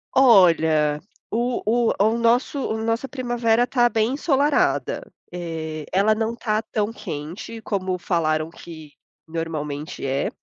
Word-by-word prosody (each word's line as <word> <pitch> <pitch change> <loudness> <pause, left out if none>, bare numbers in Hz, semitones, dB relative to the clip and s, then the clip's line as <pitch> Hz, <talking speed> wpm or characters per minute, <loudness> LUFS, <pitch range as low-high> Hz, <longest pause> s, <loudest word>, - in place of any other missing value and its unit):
Olha 160 - +5 0.3
o 240 +3 -1
o 235 +2 +2
o 220 +3 +3
nosso 235 +4 +2
o 220 -4 -2
nossa 230 +4 -1
primavera 240 -2 +1
tá 240 -2 +3
bem 225 +1 +1
ensolarada, 290 - +1 0.2
eh, 160 -3 -5
ela 205 +3 +3
não 225 +1 -2
tá 220 -2 -1
tão 210 0 0
quente 170 +8 -7
como 190 -4 -2
falaram 155 -3 0
que 160 -3 -11 0.4
normalmente 155 -2 -4
é. 135 +1 0
215 Hz, 125 wpm, -23 LUFS, 160-235 Hz, 0.4 s, Olha